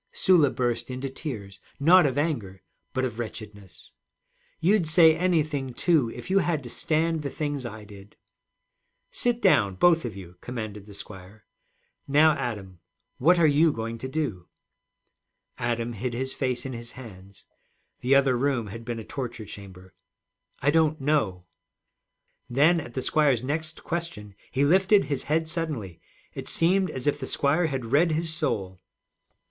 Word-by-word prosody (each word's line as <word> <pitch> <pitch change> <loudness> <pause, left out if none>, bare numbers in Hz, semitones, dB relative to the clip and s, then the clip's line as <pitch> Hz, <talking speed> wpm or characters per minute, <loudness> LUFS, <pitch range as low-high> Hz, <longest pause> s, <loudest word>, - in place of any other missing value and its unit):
Sula 170 -7 +4
burst 120 -1 -2
into 130 +1 -4
tears, 105 - -7 0.2
not 170 +3 +6
of 135 0 -3
anger 115 - -2 0.3
but 130 -1 -1
of 120 -2 -5
wretchedness. 105 -4 -9 0.7
'You'd 180 +1 +2
say 160 0 +6
anything, 155 -7 0
too, 155 -9 +2
if - - -9
you 195 - +5
had 170 -5 -1
to 120 - -8
stand 160 +3 0
the 140 - -3
things 145 -3 -3
I 110 -2 -9
did.' 100 -1 -14 1.0
'Sit 240 -1 -1
down, 100 - +4
both 165 - +4
of 115 -4 -5
you,' 90 -2 -11
commanded 110 -4 -6
the 100 - -12
squire. 100 +1 -11 0.6
'Now, 150 +3 +5
Adam, 100 - -5 0.4
what 175 +7 +5
are 170 - +4
you 155 +2 +4
going 115 -2 -5
to 130 - -5
do?' 130 - -3 1.1
Adam 120 0 -2
hid 120 +2 -4
his 130 +2 -3
face 125 -2 -2
in 130 - -4
his 120 +1 -8
hands. 100 -5 -13 0.5
The 130 +2 +3
other 135 -2 +4
room 125 -3 0
had 115 0 -8
been 120 0 -4
a 110 - -6
torture 120 -2 -6
chamber. 95 -2 -12 0.7
'I 145 - +4
don't 155 -1 +2
know.' 135 -11 0 1.0
Then, 150 +7 +4
at 120 -5 -11
the 130 - -2
squire's 140 -6 +2
next 155 +4 -4
question, 155 -12 -5 0.2
he 140 +2 +1
lifted 190 +6 +4
his 140 -1 -3
head 160 +2 0
suddenly. 150 - -4 0.3
It - - -5
seemed 185 +2 +3
as 130 -3 -6
if 145 0 +1
the 130 - -5
squire 155 +4 +1
had 130 -6 -4
read 160 +4 +4
his 160 0 -2
soul. 100 - -2
130 Hz, 160 wpm, -26 LUFS, 110-155 Hz, 1.1 s, not